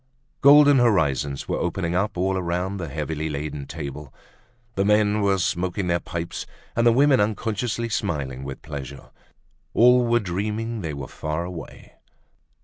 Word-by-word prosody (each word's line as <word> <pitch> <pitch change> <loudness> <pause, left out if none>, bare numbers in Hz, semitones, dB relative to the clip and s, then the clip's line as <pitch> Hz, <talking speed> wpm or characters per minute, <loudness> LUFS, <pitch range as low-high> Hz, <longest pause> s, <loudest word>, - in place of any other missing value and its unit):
Golden 145 -1 +7
horizons 70 - +1
were - - -1
opening 85 0 -2
up 100 +2 -1
all 95 +2 +1
around 90 +2 -2
the 85 -3 -4
heavily 75 +1 -3
laden 75 -1 -5
table. 70 0 -7 0.6
The 95 - 0
men 105 +1 +3
were 100 -1 +2
smoking 90 +1 -1
their 85 -1 +1
pipes 85 0 -5 0.3
and 115 +1 +3
the - - +7
women 135 +2 +4
unconsciously 110 +2 -1
smiling 70 - -3
with 70 -1 -7
pleasure. 70 -2 -8 0.6
All 125 +1 +6
were 120 0 +3
dreaming 105 +4 -3
they 80 -4 -4
were 70 -2 -6
far 80 +2 -4
away. 90 -2 -9
90 Hz, 145 wpm, -24 LUFS, 75-110 Hz, 0.6 s, Golden